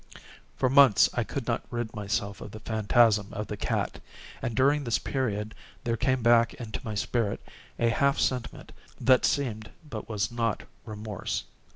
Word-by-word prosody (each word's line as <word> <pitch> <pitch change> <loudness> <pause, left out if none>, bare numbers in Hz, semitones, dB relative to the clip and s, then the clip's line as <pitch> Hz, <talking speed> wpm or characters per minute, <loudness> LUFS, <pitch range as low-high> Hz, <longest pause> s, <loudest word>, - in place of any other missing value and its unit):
For 130 - +2
months 135 -5 +6
I - - 0
could - - -5
not - - 0
rid 120 -2 -3
myself 100 -1 -3
of - - -7
the 110 - -9
phantasm 110 -1 +3
of 105 - -3
the 105 - -5
cat; - - -2 0.4
and, 120 - -3
during 140 +3 +3
this 115 -3 +1
period, 110 -5 -2 0.3
there 115 -1 0
came 130 +1 0
back 115 0 +4
into 115 -3 -6
my 110 -3 -4
spirit 105 0 -1 0.4
a 115 - +2
half 140 +4 +2
sentiment 125 -3 -2 0.3
that 130 -1 +4
seemed, 110 -7 -1 0.2
but 115 -6 -7
was 110 +1 -1
not, 115 -2 -1 0.2
remorse. 105 -3 -4
115 Hz, 165 wpm, -28 LUFS, 105-125 Hz, 0.4 s, months